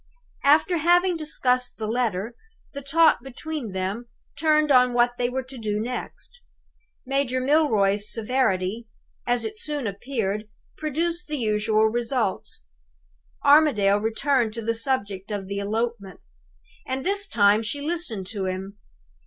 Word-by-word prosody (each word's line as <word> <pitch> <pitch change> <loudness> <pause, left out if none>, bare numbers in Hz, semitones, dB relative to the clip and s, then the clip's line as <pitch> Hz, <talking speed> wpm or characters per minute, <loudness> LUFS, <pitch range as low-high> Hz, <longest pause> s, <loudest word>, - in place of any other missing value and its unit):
"After 310 +5 +4
having 350 +3 +3
discussed 255 -5 -1
the 220 - -4
letter, 225 -2 -1 0.4
the 280 - -6
talk 320 +4 +4
between 270 -1 -6
them 190 +6 -3 0.3
turned 305 -1 +2
on 250 -1 +5
what 240 0 +4
they 245 0 +1
were 260 +1 -3
to 260 0 -10
do 210 -2 -2
next. 250 - -6 0.7
Major 270 -1 0
Milroy's 220 -8 +2
severity, 225 -3 0 0.4
as 245 0 +1
it 435 0 -5
soon 295 - -1
appeared, 210 -1 -3 0.3
produced 335 +3 -2
the 300 -1 -3
usual 215 -2 +2
results. 230 - -1 0.8
Armadale 275 -10 +5
returned 230 +1 +1
to 230 0 -5
the 230 +1 0
subject 210 -5 -2
of 205 -2 -3
the 200 +1 -4
elopement; 210 -2 -3 0.6
and 260 0 -4
this 400 +1 0
time 205 - +4
she 230 +6 -3
listened 290 - -2
to 195 0 -4
him. 190 +2 -5
240 Hz, 135 wpm, -24 LUFS, 210-285 Hz, 0.8 s, on